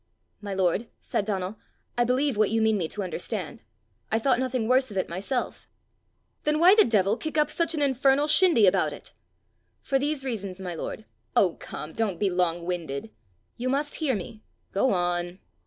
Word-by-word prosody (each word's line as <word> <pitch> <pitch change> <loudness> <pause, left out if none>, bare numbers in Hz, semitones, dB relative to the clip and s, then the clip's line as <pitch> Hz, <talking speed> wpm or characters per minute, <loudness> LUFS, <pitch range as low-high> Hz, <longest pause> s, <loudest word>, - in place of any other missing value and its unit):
"My 200 -2 -5
lord," 190 +4 0
said 205 - -2
Donal, 195 0 -3 0.4
"I 240 - +2
believe 260 +2 +1
what 215 -1 +3
you 225 +2 +1
mean 220 -1 +3
me 175 -5 -1
to 205 +5 -5
understand. 180 -1 -4 0.5
I 220 - +3
thought 245 +2 +2
nothing 255 -3 -1
worse 260 +1 +3
of 200 - -6
it 185 - 0
myself." 200 +9 -3 0.8
"Then 300 0 +1
why 350 +4 +7
the 430 0 +7
devil 205 -2 +2
kick 315 +2 -4
up 300 0 +2
such 335 -1 0
an 295 - +1
infernal 275 +1 +3
shindy 305 - +5
about 185 - +3
it?" - - -11 0.7
"For 270 -1 +1
these 285 -1 -1
reasons, 200 -7 -4
my 180 -2 -5
lord: 210 +6 -6 0.2
" - - -44
"Oh, 180 -4 +4
come! 155 +1 -7
don't 210 -6 -1
be 200 -2 +1
long 175 -1 0
winded." 160 -9 -4 0.5
"You 250 +2 -2
must 285 +2 -1
hear 275 -6 +1
me." 215 +3 -7 0.3
"Go 255 +7 +2
on." 175 -1 -1
220 Hz, 190 wpm, -26 LUFS, 185-270 Hz, 0.8 s, why